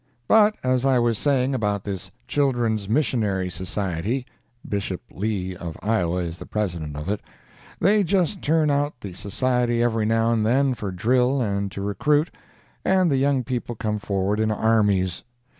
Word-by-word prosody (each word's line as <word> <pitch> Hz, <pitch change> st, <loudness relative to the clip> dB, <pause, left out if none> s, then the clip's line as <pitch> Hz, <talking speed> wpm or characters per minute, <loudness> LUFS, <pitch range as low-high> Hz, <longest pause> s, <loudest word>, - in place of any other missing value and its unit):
But, 215 Hz, -1 st, +5 dB
as 130 Hz, -1 st, +1 dB
I 135 Hz, -2 st, +3 dB
was 120 Hz, -2 st, +1 dB
saying 135 Hz, -2 st, +2 dB
about 105 Hz, -5 st, -1 dB
this 95 Hz, -3 st, -5 dB, 0.2 s
Children's 120 Hz, -7 st, 0 dB
Missionary 105 Hz, -8 st, 0 dB
Society, 95 Hz, +6 st, -2 dB, 0.4 s
(Bishop 100 Hz, -3 st, -2 dB
Lee, 95 Hz, -2 st, -2 dB
of 85 Hz, -2 st, -7 dB
Iowa, 90 Hz, -5 st, +1 dB
is 85 Hz, 0 st, -6 dB
the -, -, -9 dB
President 85 Hz, -8 st, -3 dB
of 75 Hz, +2 st, -6 dB
it,) 105 Hz, +1 st, -1 dB, 0.6 s
they 205 Hz, +3 st, +4 dB
just 185 Hz, +1 st, +1 dB
turn 155 Hz, -1 st, +2 dB
out 145 Hz, +1 st, 0 dB
the 100 Hz, -3 st, -7 dB
Society 120 Hz, +4 st, 0 dB
every 115 Hz, -2 st, +1 dB
now 115 Hz, +1 st, +2 dB
and 115 Hz, -2 st, +1 dB
then 130 Hz, +4 st, +3 dB
for 105 Hz, -4 st, -5 dB
drill 125 Hz, +8 st, +2 dB
and 100 Hz, -4 st, -1 dB
to 100 Hz, -, -5 dB
recruit, 150 Hz, +10 st, +1 dB, 0.5 s
and 185 Hz, -3 st, +3 dB
the 135 Hz, -, +2 dB
young 135 Hz, -1 st, +2 dB
people 120 Hz, -1 st, -3 dB
come 105 Hz, 0 st, -2 dB
forward 100 Hz, 0 st, -1 dB
in 110 Hz, 0 st, +2 dB
armies. 105 Hz, -5 st, +1 dB
110 Hz, 160 wpm, -24 LUFS, 100-130 Hz, 0.6 s, But